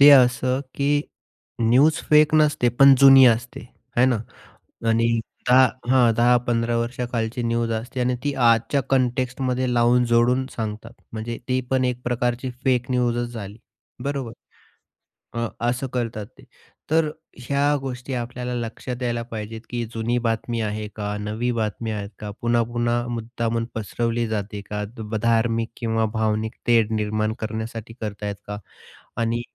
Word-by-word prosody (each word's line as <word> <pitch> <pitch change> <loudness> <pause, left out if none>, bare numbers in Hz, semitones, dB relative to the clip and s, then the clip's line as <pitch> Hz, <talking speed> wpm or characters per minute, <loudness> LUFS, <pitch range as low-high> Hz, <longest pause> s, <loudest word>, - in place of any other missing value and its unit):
ते 145 +1 +10
असं 125 0 +5
की 145 +1 +2 0.6
न्यूज 140 +8 +4
फेक 150 0 +6
नसते, 150 -5 +3
पण 135 +3 +7
जुनी 135 -1 +9
असते 120 +2 +1 0.4
आहे 125 +2 +5
ना 125 -3 +2 0.7
आणि 115 +1 +3 0.4
दहा 130 +1 +7 0.2
हां, 125 -3 +5
10-15 120 0 +2
वर्षाखालची 120 0 -2
न्यूज 115 0 0
असते 115 +3 -4
आणि 125 0 +1
ती 145 - 0
आजच्या 120 +2 +3
कॉन्टेक्स्टमध्ये 130 0 0
लावून, 120 +1 +4
जोडून 120 +2 +3
सांगतात. 110 -1 -5 0.2
म्हणजे 115 +1 -4
ती 130 0 +1
पण 130 -1 +2
एक 125 0 -2
प्रकारची 125 +1 -1
फेक 125 -2 +1
न्यूजच 120 -1 0
झाली. 105 -2 -7 0.5
बरोबर. 135 -4 -3 1.0
अ, 115 0 -1 0.2
असं 125 +2 -2
करतात 115 -4 -2
ते. - - -16 0.5
तर 160 -1 +3 0.3
ह्या 140 +3 +1
गोष्टी 130 0 -5
आपल्याला 125 0 -4
लक्षात 120 +2 -5
यायला 120 -1 -1
पाहिजेत, 110 0 -6
की 120 -1 -2
जुनी 115 +2 -1
बातमी 115 +1 -1
आहे 105 0 -3
का, 105 -1 -3
नवी 110 +4 -2
बातमी 110 -1 -2
आहेत 100 -1 -4
का, 105 -1 -6
पुन्हा-पुन्हा 120 0 +1
मुद्दामून 115 -1 -2
पसरवली 115 +2 -1
जाते 105 -1 -3
का, 105 0 -3 0.3
धार्मिक 115 0 +1
किंवा 115 -1 0
भावनिक 110 0 -1
तेढ 115 -2 +4
निर्माण 110 0 0
करण्यासाठी 110 +1 -5
करत 105 -1 -5
आहेत 100 -1 -2
का 105 - -4 0.6
आणि 115 +1 0
120 Hz, 140 wpm, -23 LUFS, 115-125 Hz, 1.0 s, ते